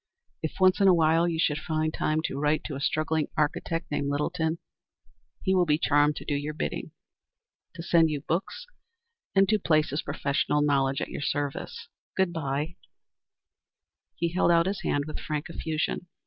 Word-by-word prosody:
If 160 Hz, -, -4 dB
once 185 Hz, -1 st, +5 dB
in 195 Hz, -, +6 dB
a 185 Hz, -, +7 dB
while 165 Hz, +1 st, +3 dB
you 165 Hz, -1 st, -1 dB
should 150 Hz, -2 st, +1 dB
find 155 Hz, 0 st, -1 dB
time 155 Hz, +1 st, 0 dB
to 135 Hz, -, -3 dB
write 150 Hz, +1 st, +1 dB
to 150 Hz, -, -5 dB
a 135 Hz, -, -5 dB
struggling 155 Hz, 0 st, 0 dB
architect 165 Hz, +2 st, -1 dB
named 145 Hz, -1 st, -1 dB
Littleton, 160 Hz, +3 st, -1 dB, 0.9 s
he 190 Hz, -, +2 dB
will 180 Hz, -2 st, +3 dB
be 150 Hz, 0 st, +3 dB
charmed 145 Hz, -1 st, +3 dB
to -, -, -8 dB
do -, -, -1 dB
your 145 Hz, +1 st, -3 dB
bidding -, -, -3 dB, 0.9 s
to 165 Hz, -, -6 dB
send 165 Hz, -2 st, +4 dB
you 150 Hz, -2 st, -3 dB
books 195 Hz, -, -3 dB, 0.7 s
and 195 Hz, 0 st, +5 dB
to 215 Hz, +1 st, +2 dB
place 155 Hz, -6 st, +2 dB
his 145 Hz, -, -1 dB
professional 145 Hz, +1 st, 0 dB
knowledge 135 Hz, -2 st, +1 dB
at -, -, -3 dB
your -, -, -5 dB
service. 145 Hz, 0 st, -3 dB, 0.3 s
Good 190 Hz, -2 st, +2 dB
by." 150 Hz, +1 st, -3 dB, 1.4 s
He 170 Hz, +1 st, 0 dB
held 175 Hz, +1 st, +2 dB
out 170 Hz, 0 st, +5 dB
his 195 Hz, +1 st, -2 dB
hand 145 Hz, 0 st, 0 dB
with 155 Hz, -, -6 dB
frank 150 Hz, +2 st, -4 dB
effusion. 160 Hz, +2 st, -2 dB
155 Hz, 175 wpm, -27 LUFS, 145-170 Hz, 1.4 s, a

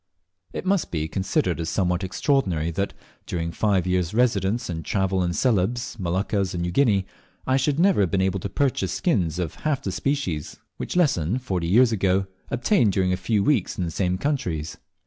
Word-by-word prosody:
It -, -, -5 dB
must 195 Hz, -2 st, +1 dB
be 80 Hz, -2 st, -2 dB
considered 90 Hz, -1 st, 0 dB
as 80 Hz, 0 st, -2 dB
somewhat 90 Hz, +1 st, 0 dB
extraordinary 95 Hz, -, 0 dB
that, 100 Hz, +4 st, -2 dB, 0.3 s
during 85 Hz, -1 st, -2 dB
five 95 Hz, 0 st, +1 dB
years' 90 Hz, 0 st, 0 dB
residence 115 Hz, -2 st, +1 dB
and 80 Hz, -2 st, -4 dB
travel 95 Hz, +2 st, 0 dB
in 85 Hz, -, 0 dB
Celebes, 120 Hz, +3 st, 0 dB
the 115 Hz, -, -11 dB
Moluccas, 95 Hz, +2 st, -1 dB
and 85 Hz, -, -2 dB
New 90 Hz, -, -2 dB
Guinea, 100 Hz, -3 st, +3 dB, 0.4 s
I 130 Hz, -, +2 dB
should 140 Hz, +2 st, +1 dB
never 190 Hz, -, +4 dB
have 95 Hz, -, +2 dB
been 95 Hz, -, 0 dB
able 95 Hz, +1 st, +1 dB
to 100 Hz, -, -4 dB
purchase 140 Hz, +5 st, 0 dB
skins 90 Hz, -, 0 dB
of 90 Hz, -3 st, -2 dB
half 145 Hz, -3 st, 0 dB
the 95 Hz, -, -2 dB
species 95 Hz, -, -2 dB, 0.2 s
which -, -, -5 dB
Lesson, 120 Hz, -, +2 dB
forty 95 Hz, -10 st, -2 dB
years 115 Hz, +7 st, +5 dB
ago, 95 Hz, -2 st, +1 dB, 0.2 s
obtained 120 Hz, -, +2 dB
during 90 Hz, -1 st, +1 dB
a -, -, +2 dB
few 100 Hz, +3 st, 0 dB
weeks 130 Hz, -9 st, +1 dB
in 90 Hz, -, -1 dB
the 85 Hz, -, -3 dB
same 90 Hz, +1 st, 0 dB
countries. 90 Hz, -, -2 dB
95 Hz, 190 wpm, -24 LUFS, 90-125 Hz, 0.4 s, years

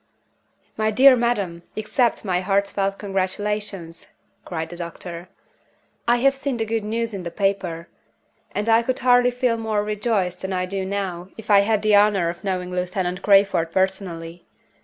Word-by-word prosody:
"My 215 Hz, 0 st, +1 dB
dear 255 Hz, +5 st, +7 dB
madam, 205 Hz, -8 st, -1 dB, 0.2 s
accept 225 Hz, +2 st, 0 dB
my 180 Hz, -2 st, 0 dB
heartfelt 195 Hz, 0 st, 0 dB
congratulations!" 195 Hz, -2 st, -3 dB, 0.4 s
cried 160 Hz, -2 st, -4 dB
the 175 Hz, -, -8 dB
doctor. 170 Hz, +1 st, -7 dB, 0.8 s
"I 240 Hz, -, +5 dB
have 270 Hz, +3 st, +3 dB
seen 270 Hz, -2 st, -3 dB
the 225 Hz, -, -1 dB
good 225 Hz, 0 st, -2 dB
news 225 Hz, +1 st, -2 dB
in 195 Hz, -, -4 dB
the 175 Hz, -, -5 dB
paper; 185 Hz, -3 st, -2 dB, 0.6 s
and 205 Hz, +2 st, -3 dB
I 225 Hz, 0 st, +5 dB
could 255 Hz, +2 st, -1 dB
hardly 245 Hz, -1 st, +4 dB
feel 245 Hz, -1 st, 0 dB
more 220 Hz, -2 st, -1 dB
rejoiced 210 Hz, -4 st, -1 dB
than 190 Hz, 0 st, -3 dB
I 185 Hz, 0 st, 0 dB
do 190 Hz, +1 st, -3 dB
now 190 Hz, -2 st, -4 dB
if 220 Hz, -1 st, -5 dB
I 200 Hz, -, +8 dB
had 210 Hz, +1 st, +1 dB
the 215 Hz, 0 st, +3 dB
honor 205 Hz, -4 st, +4 dB
of 170 Hz, -, -7 dB
knowing 185 Hz, -2 st, -2 dB
Lieutenant 180 Hz, 0 st, -2 dB
Crayford 195 Hz, -5 st, +3 dB
personally. 175 Hz, -3 st, -2 dB
200 Hz, 160 wpm, -22 LUFS, 180-220 Hz, 0.8 s, I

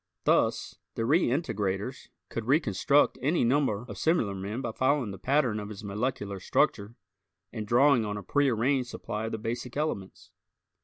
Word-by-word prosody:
Thus, -, -, +1 dB, 0.2 s
the 115 Hz, -, -1 dB
reintegrators 120 Hz, -, 0 dB, 0.2 s
could 115 Hz, -, -4 dB
reconstruct 140 Hz, -, +3 dB
any 155 Hz, +6 st, +2 dB
number 120 Hz, -3 st, +1 dB
of 105 Hz, -5 st, -8 dB
similar 160 Hz, -, +1 dB
men 100 Hz, +5 st, -4 dB
by 120 Hz, -3 st, -3 dB
following 130 Hz, -2 st, +1 dB
the 95 Hz, -, -9 dB
pattern 130 Hz, -6 st, +1 dB
of 105 Hz, 0 st, -6 dB
his 105 Hz, 0 st, -9 dB
molecular 105 Hz, -1 st, -3 dB
structure 100 Hz, +4 st, 0 dB, 0.6 s
and 110 Hz, -3 st, -5 dB
drawing 125 Hz, +1 st, +4 dB
on 105 Hz, -1 st, -3 dB
a 100 Hz, -, -6 dB
prearranged 130 Hz, +1 st, +1 dB
supply 110 Hz, -2 st, -5 dB
of -, -, -5 dB
the -, -, -2 dB
basic 120 Hz, +3 st, -5 dB
elements. 145 Hz, -11 st, -4 dB
115 Hz, 155 wpm, -28 LUFS, 105-135 Hz, 0.6 s, drawing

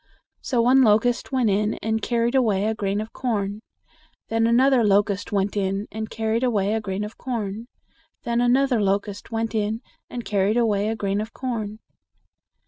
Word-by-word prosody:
So 240 Hz, -3 st, +1 dB
one 260 Hz, +3 st, +5 dB
locust 235 Hz, +2 st, +2 dB
went 250 Hz, -5 st, +2 dB
in 210 Hz, +2 st, +1 dB
and 220 Hz, 0 st, -2 dB
carried 235 Hz, 0 st, 0 dB
away 215 Hz, -7 st, +2 dB
a 220 Hz, -, +1 dB
grain 205 Hz, -1 st, -1 dB
of 220 Hz, -, -8 dB
corn; 210 Hz, -4 st, -2 dB, 0.7 s
then 225 Hz, 0 st, +2 dB
another 255 Hz, +1 st, +4 dB
locust 200 Hz, -1 st, +2 dB
went 200 Hz, 0 st, 0 dB
in 195 Hz, +1 st, -1 dB
and 220 Hz, 0 st, -5 dB
carried 225 Hz, +1 st, -1 dB
away 210 Hz, -5 st, +1 dB
a 225 Hz, -, 0 dB
grain 195 Hz, -1 st, -3 dB
of 210 Hz, -, -10 dB
corn; 225 Hz, -3 st, -4 dB, 0.6 s
then 235 Hz, 0 st, 0 dB
another 250 Hz, -1 st, +3 dB
locust 200 Hz, +1 st, -1 dB
went 225 Hz, 0 st, -2 dB
in 215 Hz, +1 st, -1 dB, 0.3 s
and 240 Hz, -1 st, -6 dB
carried 205 Hz, +2 st, +1 dB
away 210 Hz, -3 st, +2 dB
a 225 Hz, -, -1 dB
grain 200 Hz, -1 st, -1 dB
of 220 Hz, +1 st, -7 dB
corn." 220 Hz, -5 st, -4 dB
220 Hz, 170 wpm, -23 LUFS, 205-235 Hz, 0.7 s, one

